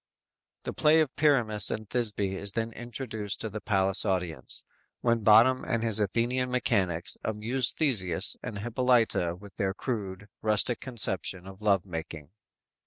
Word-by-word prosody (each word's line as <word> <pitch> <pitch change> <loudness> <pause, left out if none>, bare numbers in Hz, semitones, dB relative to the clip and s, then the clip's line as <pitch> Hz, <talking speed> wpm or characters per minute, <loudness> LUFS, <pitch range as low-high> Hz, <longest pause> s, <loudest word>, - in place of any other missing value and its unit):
"_ - - -48
The - - -5
play 155 +1 +4
of 155 -4 0
Pyramus 115 -9 +4
and 110 0 -4
Thisby 105 -5 0
is 100 +1 -2
then 115 0 -2
introduced 110 -3 -4
to 110 - -4
the 110 - -6
palace 95 -1 +1
audience, 90 -8 -3 0.4
when 115 -1 +2
Bottom 115 +5 +5
and 115 -1 -2
his 110 -2 +3
Athenian 120 +5 0
mechanics 95 -9 -1
amuse 110 +3 +1
Theseus 100 - +2
and 105 - -6
Hippolyta 115 -5 +1
with 100 +2 -15
their 95 -2 -1
crude, 100 -6 -5
rustic 110 +2 +1
conception 95 -7 -2
of 95 +1 -12
love 100 -3 +2
making. 80 -3 -7
110 Hz, 150 wpm, -28 LUFS, 95-120 Hz, 0.4 s, Bottom